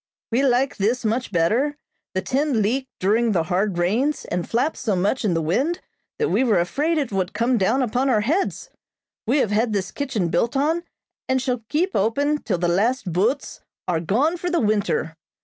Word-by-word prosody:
"We 240 +4 +2
like 265 +1 +2
this 230 +5 0
much 230 +3 -1
better. 225 - +1 0.4
The 190 - 0
tent 280 +1 0
leaked 240 +5 0
during 220 +4 +2
the 170 -4 +2
hard 185 +2 0
rains, 230 +13 0
and 175 0 -3
flapped 255 +7 0
so 210 -4 -1
much 200 +8 0
in 190 -6 +1
the 165 - 0
wind 270 - 0 0.4
that 450 - 0
we - - +2
were 225 -7 +3
afraid 295 - 0
it 280 -7 -1
would 190 -2 -1
come 235 +4 +2
down 235 +8 +2
upon 255 +3 0
our 220 -5 +3
heads. 320 - -1 0.6
We 255 +6 +3
have 225 -7 +1
had 220 +2 +1
this 195 -2 -2
kitchen 245 -11 -2
built 230 - 0
on, 315 +5 +1 0.5
and 260 0 +2
shall 250 -2 -2
keep 355 +6 0
open 285 +9 +1
till 210 -5 -1
the 175 +1 0
last 200 +2 +1
boats 225 - 0 0.3
are 175 -3 +1
gone 250 - +1
for 355 +1 -3
the 345 -1 +1
winter. 205 -7 0
230 Hz, 195 wpm, -22 LUFS, 195-275 Hz, 0.6 s, were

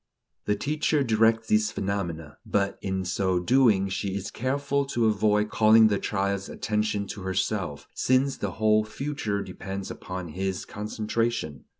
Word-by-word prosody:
The 105 - +1
teacher 150 +4 0
directs 115 -1 +3
these 105 0 +3
phenomena; 85 -7 -4
but, 100 -1 -1
in 95 -1 -2
so 95 0 0
doing, 110 -1 +4
she 95 0 -3
is 100 +1 -4
careful 140 +3 0
to 120 -4 0
avoid 105 0 +2
calling 110 0 +6
the 100 -2 +1
child's 100 -1 -1
attention 105 -1 -1
to 100 - -6
herself, 95 -5 -2
since 130 +2 +2
the 100 -3 -3
whole 110 0 +3
future 110 -3 -3
depends 95 0 -6
upon 90 -2 -6
his 95 +3 -3
concentration. 105 - -3
105 Hz, 140 wpm, -26 LUFS, 95-110 Hz, -, calling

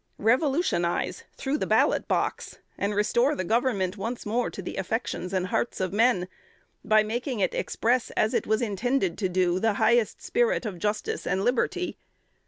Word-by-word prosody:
Revolutionize 250 - +1
through 285 +2 -1
the - - -1
ballot - - +2
box, - - -1 0.2
and 205 +1 -2
restore 240 +7 +2
the 185 - -2
Government 215 -3 0
once 230 +5 -4
more 235 +4 0
to - - -10
the - - -6
affections 190 -2 -3
and 185 -2 0
hearts 210 +5 -1
of 185 0 -2
men, 220 -4 +3 0.6
by 215 0 +4
making 240 +3 -3
it 185 - +1
express, 245 +1 0
as 215 - +2
it - - 0
was 220 +2 +1
intended 210 -3 0
to 190 -4 0
do, 180 0 +1
the 225 +1 +2
highest 220 +2 +2
spirit 480 - +1
of 195 -5 -5
justice 210 +3 -2
and 190 - 0
liberty. 255 +8 0
215 Hz, 170 wpm, -26 LUFS, 190-245 Hz, 0.6 s, by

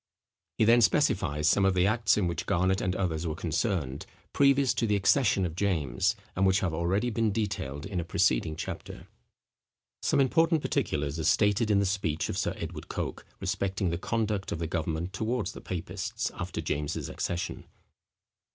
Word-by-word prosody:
He 110 - +4
then 120 +2 +6
specifies 95 - +2
some 100 - +4
of 95 -1 +3
the 90 0 +3
acts 110 +1 +3
in 105 - +2
which 85 -1 -3
Garnet 95 +2 +2
and 90 0 -1
others 85 -3 -1
were 80 - -2
concerned, 80 - -2 0.3
previous 140 -1 +4
to 115 - 0
the 105 - +2
accession 100 -1 +3
of 80 - -3
James, 85 -10 0 0.2
and 95 - +1
which 95 0 +3
have 90 -4 -1
already 95 +9 0
been 115 -1 +1
detailed 95 -10 -3
in 95 -2 -3
a - - -1
preceding 80 -3 +1
chapter. - - -7 0.9
Some - - +2
important 160 +4 +3
particulars 75 +1 -1
are - - -2
stated 105 +6 +3
in 105 - +4
the 100 - +2
speech 90 -5 -1
of - - -3
Sir - - -1
Edward - - -6
Coke, - - -5
respecting 95 -1 -1
the 85 - -2
conduct 105 -2 -1
of - - -2
the 85 - -3
government 80 +3 -2
towards 110 0 -1
the - - -10
papists, 90 -3 -4
after - - -4
James's 75 +1 -2
accession. 90 +1 -4
95 Hz, 175 wpm, -29 LUFS, 85-105 Hz, 0.9 s, then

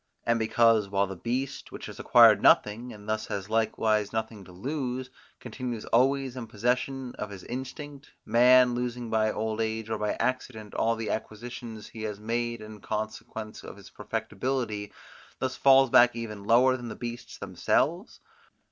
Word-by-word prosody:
And 115 0 +2
because, 110 -2 +3
while 100 0 +2
the 95 0 -7
beast, 125 +9 -3
which - - -8
has - - -9
acquired - - +7
nothing 115 +4 +3
and 105 -2 -12
has 110 -2 -3
likewise 110 -1 +1
nothing 110 -2 -4
to 90 - -14
lose, 125 - -4 0.3
continues 120 -2 -5
always 135 +1 +2
in 125 -3 -6
possession 125 +4 -1
of 105 - -4
his 100 -2 -9
instinct, 140 +3 -7 0.2
man, 125 +2 +6
losing 120 -1 -3
by 110 -1 +2
old 110 0 -2
age, 110 0 -3
or 110 - -1
by 105 0 0
accident, 115 -4 -3
all 115 0 +1
the 115 -1 -3
acquisitions 110 0 -6
he 110 - -9
had 105 -2 -4
made 115 +1 -2
in 110 0 -10
consequence 110 0 -5
of - - -10
his 100 - -14
perfectibility, 110 0 -3 0.5
thus 130 0 -2
falls 135 -2 +5
back 120 -1 +6
even 105 -3 -6
lower 125 +4 +5
than 120 -1 -7
beasts 120 0 -7
themselves? 170 - -1
115 Hz, 155 wpm, -28 LUFS, 110-125 Hz, 0.5 s, acquired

